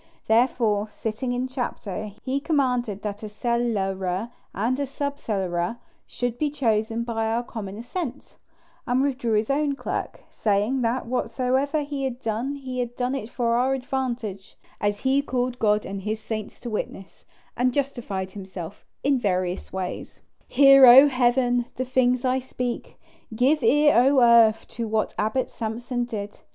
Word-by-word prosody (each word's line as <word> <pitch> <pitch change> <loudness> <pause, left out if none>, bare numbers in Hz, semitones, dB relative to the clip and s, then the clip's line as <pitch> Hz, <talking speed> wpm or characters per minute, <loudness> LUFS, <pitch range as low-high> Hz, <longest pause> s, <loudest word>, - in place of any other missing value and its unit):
Therefore, 220 -2 +2
sitting 220 +4 -4
in 250 +1 -1
chapter, 220 -6 -4 0.2
he 265 +2 -1
commanded 250 - 0
that 205 -1 -4
a 215 - -6
cellarer 205 -3 -1 0.2
and 255 +7 -1
sub 285 +1 -3
cellarer 185 -1 -2 0.3
should 245 -1 -3
be 300 - +1
chosen 225 -4 0
by 225 -1 -2
our 230 +2 0
common 205 -4 -7
assent, 255 +3 -6 0.5
and 250 +2 +2
withdrew 255 -5 -1
his 215 +4 +1
own 285 0 +1
clerk, - - -4
saying, 215 +5 +1
that 240 +2 0
whatsoever 255 +5 0
he 285 -1 -4
had 255 -2 -3
done 235 +5 -2
he 260 -2 -5
had 240 -1 -3
done 250 +1 -1
it 255 -5 -4
for 235 -1 0
our 260 +2 +2
advantage, 245 -7 -4 0.2
as 205 0 -1
he 270 +1 +3
called 250 -2 -2
God 210 -1 +2
and 195 0 -5
his 215 +2 -3
saints 215 -1 -6
to 240 - -5
witness, 195 -2 -6 0.3
and 250 +1 +2
justified 240 -9 -3
himself 190 -1 -8 0.2
in 275 -1 +2
various 185 -4 -1
ways. 185 -1 -6 0.2
"Hear, 275 0 +7
O 265 +4 +10
Heaven!" 245 -1 +2
the 255 - -2
things 250 0 +2
that 255 - +2
I 260 - +1
speak; 250 -1 -5 0.4
"give 275 +6 +3
ear, 290 +6 +5
O 265 +3 +5
earth!" 230 -2 +5
to 230 -1 -4
what 220 0 0
Abbot 220 +5 0
Samson 240 +2 -3
did. 205 -3 -6
240 Hz, 155 wpm, -24 LUFS, 215-260 Hz, 0.5 s, O